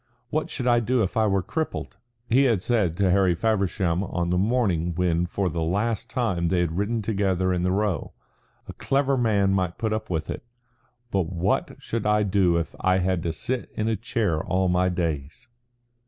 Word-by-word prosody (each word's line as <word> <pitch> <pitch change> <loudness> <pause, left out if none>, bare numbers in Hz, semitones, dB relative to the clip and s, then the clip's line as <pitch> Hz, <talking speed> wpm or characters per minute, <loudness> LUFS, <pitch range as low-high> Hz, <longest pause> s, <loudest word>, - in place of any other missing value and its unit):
"What 155 +1 -1
should 130 - -4
I 120 -1 +4
do 120 +1 +1
if 95 - -3
I 110 -1 +3
were 95 -2 +1
crippled?" 160 -8 -4 0.3
he 135 +4 +4
had 110 -8 +2
said 100 -9 +1
to 95 -3 +3
Harry 95 -2 +3
Feversham 95 -4 0
on 85 -2 -2
the 90 - +2
morning 95 -7 +1
when 90 -1 +1
for 95 +2 -1
the 85 -2 -2
last 105 +7 -1
time 95 -10 0
they 90 +1 +1
had 85 -2 0
ridden 105 +4 -1
together 95 -3 0
in 90 - 0
the 90 +1 +1
Row. 100 -5 -1 0.6
"A - - -7
clever 140 0 +1
man 105 -6 +2
might 90 -2 -1
put 110 -1 -1
up 110 - -3
with 80 -3 -2
it. - - -6 0.7
But 95 -4 +1
what 90 +1 0
should 115 -2 -3
I 105 0 +3
do 95 -4 +2
if 85 - -3
I 95 0 +2
had 95 -1 0
to 85 - -1
sit 120 +10 -3
in 110 - -1
a 115 - +1
chair 105 -6 -1
all 95 0 +1
my 90 +1 +2
days?" 80 +2 -3
95 Hz, 200 wpm, -25 LUFS, 90-110 Hz, 0.7 s, I